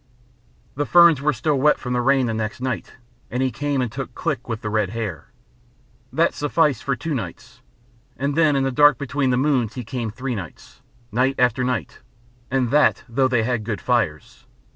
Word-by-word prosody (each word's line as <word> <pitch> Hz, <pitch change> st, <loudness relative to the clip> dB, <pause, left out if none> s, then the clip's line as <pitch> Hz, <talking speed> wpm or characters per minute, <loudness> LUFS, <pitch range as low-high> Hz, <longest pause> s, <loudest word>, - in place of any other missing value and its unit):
The 145 Hz, +2 st, -2 dB
ferns 170 Hz, -5 st, +6 dB
were 150 Hz, +2 st, +2 dB
still 150 Hz, -1 st, 0 dB
wet 150 Hz, +3 st, +4 dB
from 125 Hz, -1 st, -4 dB
the 125 Hz, -, +1 dB
rain 135 Hz, +1 st, +3 dB
the 115 Hz, -, -1 dB
next 110 Hz, 0 st, -3 dB
night, 130 Hz, 0 st, -4 dB, 0.4 s
and 125 Hz, +2 st, -1 dB
he 130 Hz, -, 0 dB
came 140 Hz, +2 st, -1 dB
and 120 Hz, -, -4 dB
took 130 Hz, 0 st, -6 dB
Click 145 Hz, -8 st, -3 dB
with 115 Hz, -1 st, -3 dB
the 105 Hz, -, -2 dB
red 105 Hz, -3 st, +1 dB
hair. 110 Hz, -5 st, -5 dB, 0.8 s
That -, -, +2 dB
sufficed 145 Hz, -3 st, +1 dB
for 135 Hz, -, 0 dB
two 160 Hz, +5 st, -4 dB
nights. 100 Hz, -11 st, -7 dB, 0.6 s
And 140 Hz, +2 st, -1 dB
then 155 Hz, -3 st, +3 dB
in 135 Hz, -, +1 dB
the 135 Hz, -, 0 dB
dark 145 Hz, +1 st, +5 dB
between 140 Hz, 0 st, -1 dB
the 125 Hz, -, +2 dB
moons 130 Hz, -5 st, +1 dB
he 125 Hz, -, -5 dB
came 115 Hz, 0 st, -4 dB
three 125 Hz, +4 st, -4 dB
nights, 95 Hz, -7 st, -9 dB, 0.3 s
night 130 Hz, +4 st, +1 dB
after 125 Hz, 0 st, +2 dB
night, 125 Hz, -2 st, -3 dB, 0.5 s
and 130 Hz, -2 st, 0 dB
that 150 Hz, +1 st, +3 dB
though 130 Hz, +3 st, +2 dB
they 120 Hz, -3 st, +1 dB
had 120 Hz, -2 st, -1 dB
good 105 Hz, -1 st, -3 dB
fires. 115 Hz, -, -2 dB
130 Hz, 195 wpm, -22 LUFS, 115-140 Hz, 0.8 s, ferns